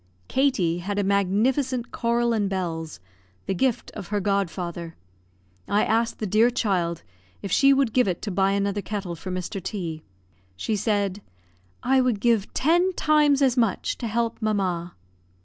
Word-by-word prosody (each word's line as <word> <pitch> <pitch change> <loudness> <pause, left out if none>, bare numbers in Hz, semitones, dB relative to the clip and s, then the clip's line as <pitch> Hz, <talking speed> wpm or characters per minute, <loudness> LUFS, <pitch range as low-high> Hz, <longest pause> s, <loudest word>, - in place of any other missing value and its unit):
Katie 225 -12 +1
had 200 +3 -4
a 205 - +2
magnificent 235 +7 +1
coral 235 0 +1
and 205 -3 0
bells, 165 - -4 0.5
the - - -1
gift 245 +5 0
of 190 - -8
her 205 0 -1
godfather; 175 -4 -2 0.7
I 205 +1 +2
asked 230 +1 +1
the 215 - -3
dear 215 +4 +4
child 180 -8 -1 0.4
if 200 - -4
she 275 +9 +5
would 270 -5 +2
give 250 -4 +3
it 180 -2 -1
to 210 - -3
buy 195 +1 +2
another 200 0 0
kettle 200 -4 -4
for 185 - -8
Mr. 185 +1 -4
T. 170 -5 -4 0.6
She 215 - -1
said, 205 -1 0 0.6
"I 265 +1 +4
would 250 -5 +1
give 225 -3 +1
ten 350 +6 +3
times 300 -4 +3
as 260 -3 +3
much 230 -6 0
to 235 - -3
help 230 +1 -1
mamma." 185 -5 -1
205 Hz, 160 wpm, -25 LUFS, 185-240 Hz, 0.7 s, she